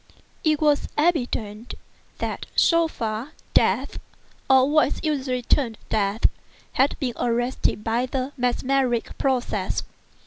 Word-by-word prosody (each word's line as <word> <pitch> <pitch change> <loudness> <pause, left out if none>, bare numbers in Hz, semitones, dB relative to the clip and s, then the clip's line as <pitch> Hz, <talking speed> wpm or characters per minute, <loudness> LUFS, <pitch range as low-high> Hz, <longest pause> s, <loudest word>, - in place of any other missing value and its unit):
It 310 -2 +2
was 295 -2 +2
evident 245 -9 -1 0.4
that, - - -4
so 335 -1 +4
far, 230 -1 -4 0.2
death - - +2 0.5
(or 265 0 +6
what 305 +1 +4
is - - -9
usually 265 -5 -1
termed 235 -3 +1
death) 205 0 0 0.5
had 270 +2 +2
been 255 -4 -1
arrested 240 -2 0
by 235 +3 0
the 265 +2 -3
mesmeric 250 -1 0
process. 260 -3 0
255 Hz, 115 wpm, -24 LUFS, 235-285 Hz, 0.5 s, or